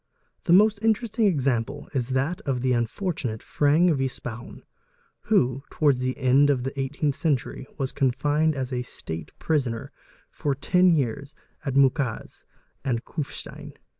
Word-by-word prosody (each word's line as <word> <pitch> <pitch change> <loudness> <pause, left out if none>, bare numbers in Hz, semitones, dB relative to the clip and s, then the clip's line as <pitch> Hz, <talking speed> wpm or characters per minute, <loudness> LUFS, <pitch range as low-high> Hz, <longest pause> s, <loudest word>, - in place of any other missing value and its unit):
The 175 - +1
most 210 +3 +6
interesting 225 0 +2
example 135 - 0
is 130 -3 -1
that 135 +7 -1
of 130 -3 -2
the 130 0 +2
unfortunate 120 - -2
Fang 160 +4 +3
v. 135 -2 0
Spaun 120 -1 -8 0.6
who, 135 - +2
towards 145 -5 +2
the 130 0 -1
end 135 +2 +4
of 130 -4 +1
the 135 - -2
ce 135 -1 -3
18th 145 -2 +1
century, 140 -3 -1
was 135 -2 -2
confined 145 +4 +1
as 130 -1 -3
a 125 - -1
"state 80 -10 -7
prisoner"' 130 -8 -1 0.4
for 145 -2 -1
ten 180 +6 +3
years 140 +1 -2 0.3
at 135 -3 -3
Mukeez 135 -3 +1 0.4
and 120 -3 -1
Kufstein. 145 -3 -6
135 Hz, 145 wpm, -25 LUFS, 125-155 Hz, 0.6 s, most